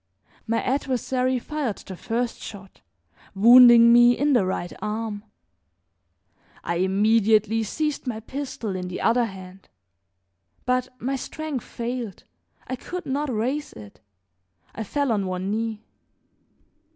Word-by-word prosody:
My 230 0 0
adversary 255 -1 0
fired 265 -3 -3
the 190 - -9
first 235 +5 -3
shot, 195 -2 -11 0.5
wounding 235 +2 +8
me 240 0 +6
in 290 +1 +2
the 215 -7 +3
right 175 -1 -3
arm. 215 -1 -4 1.4
I 170 0 -2
immediately 215 +3 +3
seized 295 +6 -3
my 225 -3 -3
pistol 245 -4 -5
in 180 -1 -4
the 180 - -5
other 235 +1 +2
hand; 190 -2 -11 1.0
but 255 0 +1
my 270 +3 -2
strength 300 -1 -5
failed, 235 -3 -5 0.4
I 260 - -4
could 360 +8 -7
not 280 +1 -2
raise 255 +7 -2
it; 105 -1 -13 0.7
I 225 - -5
fell 280 +5 -1
on 200 -3 0
one 185 +1 -3
knee. 220 0 -3
230 Hz, 125 wpm, -24 LUFS, 205-255 Hz, 1.4 s, wounding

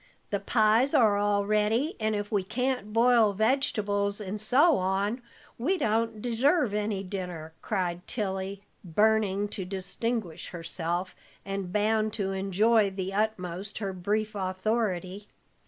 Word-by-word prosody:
The 200 - 0
pies 220 +5 +3
are 215 -5 +5
all 205 0 +1
ready, 215 - +1
and 215 0 0
if 205 0 -4
we 205 -2 +2
can't 250 +1 -2
boil 230 -2 +4
vegetables 205 -3 0
and 205 0 -3
so 280 +9 +4
on, 195 +6 0 0.4
we 350 +11 +1
don't 225 -3 0
deserve 245 - +2
any 210 -2 -1
dinner," 180 -4 -6
cried 180 -4 -2
Tilly, 195 -2 -3 0.2
burning 205 +2 +2
to 195 - -4
distinguish 195 0 -3
herself, 175 +1 -3 0.3
and 195 -2 -4
bound 215 +1 +1
to 200 -3 -2
enjoy 200 +3 +2
to 190 - -13
the 190 0 -3
utmost 195 -2 -2
her 195 -3 -3
brief 210 +4 -1
authority. 190 0 -2
205 Hz, 135 wpm, -28 LUFS, 190-220 Hz, 0.4 s, are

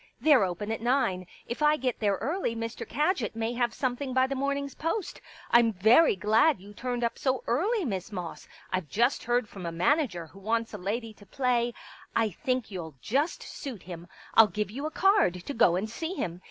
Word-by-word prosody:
They're 275 -2 +5
open 190 +4 -4
at 225 - -3
nine. 230 -8 +1 0.2
If 240 +5 -5
I 300 0 +4
get 255 -3 -2
there 205 -3 +2
early 275 - -2
Mr. 230 0 -5
Kadgit 305 - 0
may 225 +1 -1
have 240 -1 0
something 255 +1 -2
by 260 0 +5
the 270 - -3
morning's 280 0 -2
post.... 330 +5 -3 0.3
I'm 235 -1 +6
very 220 - +5
glad 220 - +3
you 200 +2 -13
turned 245 +2 -3
up 235 - -1
so 260 -1 0
early. 380 - +1
Miss 195 -5 -3
Moss. 180 -4 -6 0.3
I've 185 -5 -1
just 240 +5 +1
heard 240 -1 +1
from 190 -4 -7
a - - -3
manager 180 - +1
who 185 +5 -15
wants 225 +3 -1
a 210 - -5
lady 220 +4 -3
to 205 - -17
play.... 240 0 0 0.4
I 225 -2 +2
think 255 +5 -2
you'll 165 -6 -6
just 285 - -1
suit 250 -9 -7
him. 175 -1 -9 0.3
I'll 225 -1 +8
give 210 +1 -3
you 280 +6 -4
a - - -3
card 315 - +3
to 285 - -4
go 185 -8 +4
and 195 +4 -1
see 320 +11 -4
him. 175 - -3
235 Hz, 205 wpm, -28 LUFS, 200-275 Hz, 0.4 s, I'll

